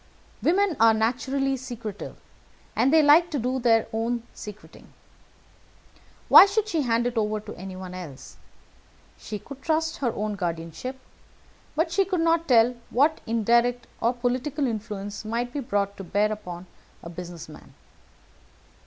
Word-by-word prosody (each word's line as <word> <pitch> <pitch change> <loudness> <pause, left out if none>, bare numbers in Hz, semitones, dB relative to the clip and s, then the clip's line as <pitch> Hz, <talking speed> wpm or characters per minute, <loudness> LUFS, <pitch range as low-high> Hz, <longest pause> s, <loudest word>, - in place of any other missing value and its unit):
Women 375 0 +2
are 225 0 +6
naturally 265 +4 0
secretive, 235 -5 -7 0.6
and 270 - +3
they 315 0 +6
like 315 +4 +6
to 300 - -2
do 255 +1 -1
their 225 -2 +3
own 230 +1 -1
secreting. 210 +1 -11 1.4
Why - - +10
should 415 +1 0
she 335 -7 0
hand 235 -2 +1
it 245 -1 0
over 215 0 0
to - - -9
anyone 185 0 -8
else? 170 -8 -9 0.8
She 215 - -5
could 275 +6 -11
trust 320 +1 0
her 245 -4 0
own 210 0 -2
guardianship, 170 - -4 0.8
but 325 +2 +1
she 390 +3 +3
could 370 -3 -1
not 330 0 +2
tell 240 -2 +5 0.2
what 295 +6 +2
indirect 235 +2 +2 0.2
or 235 - +3
political 255 +4 -1
influence 210 -3 -4
might 235 +3 -3
be 290 - -2
brought 200 -6 -1
to 195 - -7
bear 205 +4 +1
upon 180 -4 -7 0.4
a 170 - -7
business 175 -1 -8
man. 155 - -14
235 Hz, 145 wpm, -25 LUFS, 210-280 Hz, 1.4 s, Why